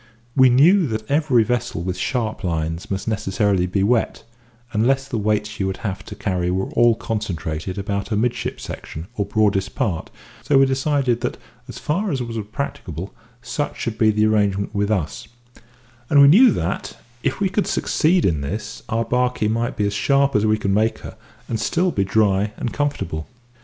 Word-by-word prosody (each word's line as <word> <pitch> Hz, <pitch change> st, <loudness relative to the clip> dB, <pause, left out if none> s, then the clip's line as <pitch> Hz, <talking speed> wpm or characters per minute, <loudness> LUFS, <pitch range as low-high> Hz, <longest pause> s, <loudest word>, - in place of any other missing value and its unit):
We 130 Hz, -1 st, +6 dB
knew 160 Hz, +8 st, +5 dB
that 110 Hz, 0 st, -4 dB
every 145 Hz, -6 st, +3 dB
vessel 120 Hz, -6 st, -2 dB
with 90 Hz, 0 st, -2 dB
sharp 110 Hz, -3 st, -2 dB
lines 80 Hz, -1 st, -2 dB
must 95 Hz, +1 st, -3 dB
necessarily 100 Hz, -3 st, +1 dB
be 95 Hz, +2 st, 0 dB
wet, 115 Hz, +2 st, +1 dB, 0.5 s
unless 135 Hz, +5 st, +2 dB
the 120 Hz, -5 st, -2 dB
weights 105 Hz, 0 st, +1 dB
she 105 Hz, -2 st, -5 dB
would 95 Hz, 0 st, -2 dB
have 95 Hz, -2 st, -3 dB
to 105 Hz, -, -8 dB
carry 90 Hz, -4 st, -1 dB
were 95 Hz, +1 st, -1 dB
all 120 Hz, -1 st, +4 dB
concentrated 90 Hz, -6 st, -4 dB
about 100 Hz, 0 st, -2 dB
her 110 Hz, -, -2 dB
midship 120 Hz, +3 st, -1 dB
section, 80 Hz, +2 st, -7 dB
or 100 Hz, -, -1 dB
broadest 100 Hz, -2 st, +1 dB
part, 105 Hz, -11 st, -2 dB, 0.3 s
so 140 Hz, -, +2 dB
we 135 Hz, -, +6 dB
decided 135 Hz, -2 st, 0 dB
that 125 Hz, -, -2 dB, 0.3 s
as -, -, -8 dB
far 190 Hz, +7 st, -1 dB
as 135 Hz, -, -1 dB
was 115 Hz, -2 st, -4 dB, 0.2 s
practicable 95 Hz, -, -5 dB, 0.3 s
such 145 Hz, +3 st, -3 dB
should 115 Hz, -3 st, -3 dB
be 110 Hz, -, +5 dB
the 105 Hz, 0 st, +2 dB
arrangement 100 Hz, -2 st, +1 dB
with 100 Hz, 0 st, 0 dB
us; 95 Hz, -8 st, -2 dB, 0.8 s
and 145 Hz, -, +5 dB
we 140 Hz, -, +9 dB
knew 225 Hz, -, +8 dB
that, 85 Hz, -, -2 dB, 0.2 s
if -, -, -1 dB
we 200 Hz, -, +2 dB
could 200 Hz, +2 st, -1 dB
succeed 170 Hz, +2 st, +2 dB
in 80 Hz, -5 st, +1 dB
this, 105 Hz, +9 st, -5 dB
our 115 Hz, +1 st, 0 dB
barkie 125 Hz, -1 st, +1 dB
might 115 Hz, +2 st, -1 dB
be 105 Hz, -, +1 dB
as 100 Hz, -, -1 dB
sharp 140 Hz, +5 st, +2 dB
as 105 Hz, +1 st, +3 dB
we 110 Hz, 0 st, +3 dB
could 100 Hz, -2 st, -1 dB
make 110 Hz, +3 st, +2 dB
her, -, -, -8 dB, 0.3 s
and 115 Hz, -, -2 dB
still 180 Hz, +8 st, +1 dB
be 100 Hz, -, 0 dB
dry 100 Hz, 0 st, +1 dB
and 120 Hz, -, -3 dB
comfortable. 140 Hz, -, -2 dB
110 Hz, 185 wpm, -21 LUFS, 100-130 Hz, 0.8 s, we